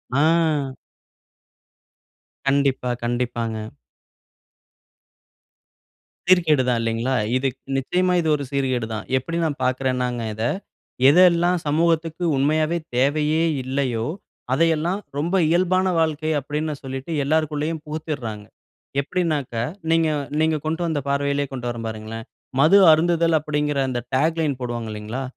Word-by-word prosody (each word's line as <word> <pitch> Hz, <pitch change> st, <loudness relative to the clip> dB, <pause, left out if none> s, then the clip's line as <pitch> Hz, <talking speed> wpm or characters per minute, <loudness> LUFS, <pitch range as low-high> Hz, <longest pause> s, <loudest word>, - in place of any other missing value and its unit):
ஆ. 150 Hz, -3 st, +2 dB, 1.7 s
கண்டிப்பா, 135 Hz, -2 st, +1 dB
கண்டிப்பாங்க. 120 Hz, -2 st, -2 dB, 2.7 s
சீர்கேடு 165 Hz, -7 st, +4 dB
தான். 120 Hz, -2 st, +2 dB
இல்லேங்களா! 115 Hz, +3 st, -1 dB, 0.2 s
இது 135 Hz, +1 st, 0 dB, 0.3 s
நிச்சயமா 180 Hz, +7 st, +1 dB
இது 160 Hz, -, 0 dB
ஒரு 140 Hz, -, -4 dB
சீர்கேடு 130 Hz, -5 st, 0 dB
தான். 105 Hz, -, -5 dB
எப்பிடி 165 Hz, +6 st, -3 dB
நான் 145 Hz, -4 st, -3 dB
பார்க்குறேன்னாங்க 125 Hz, -1 st, 0 dB
இத, 110 Hz, +1 st, -4 dB, 0.7 s
எதெல்லாம் 175 Hz, +1 st, +5 dB
சமூகத்துக்கு 165 Hz, +2 st, +1 dB
உண்மையாவே 155 Hz, +4 st, +1 dB, 0.2 s
தேவையே 150 Hz, +4 st, +2 dB, 0.2 s
இல்லையோ! 130 Hz, -3 st, -1 dB, 0.5 s
அதையெல்லாம் 165 Hz, +5 st, +1 dB, 0.2 s
ரொம்ப 170 Hz, +6 st, 0 dB
இயல்பான 185 Hz, +2 st, +2 dB
வாழ்க்கை 160 Hz, 0 st, 0 dB
அப்பிடின்னு 150 Hz, +2 st, -3 dB
சொல்லிட்டு 135 Hz, +4 st, -6 dB
எல்லாருக்குள்ளயும் 155 Hz, +1 st, 0 dB
புகுத்திட்றாங்க. 140 Hz, -9 st, -5 dB, 0.6 s
எப்பிடினாக்க, 150 Hz, -6 st, -2 dB, 0.3 s
நீங்க 165 Hz, -1 st, +3 dB, 0.3 s
நீங்க 160 Hz, 0 st, +2 dB
கொண்டு 160 Hz, +2 st, -1 dB
வந்த 160 Hz, -3 st, -1 dB
பார்வையிலே 140 Hz, 0 st, 0 dB
கொண்டு 125 Hz, -2 st, -5 dB
வரேன் 115 Hz, -1 st, -5 dB
பாருங்களேன்! 110 Hz, +1 st, -7 dB, 0.3 s
மது 160 Hz, +7 st, +6 dB
அருந்துதல் 165 Hz, 0 st, +3 dB
அப்பிடிங்கிற 150 Hz, -1 st, -1 dB
அந்த 125 Hz, -1 st, -2 dB, 0.2 s
டேக் 160 Hz, +5 st, +1 dB
லைன் 140 Hz, -5 st, -1 dB
போடுவாங்க.இல்லேங்களா! 115 Hz, 0 st, -4 dB
145 Hz, 105 wpm, -22 LUFS, 130-160 Hz, 2.7 s, மது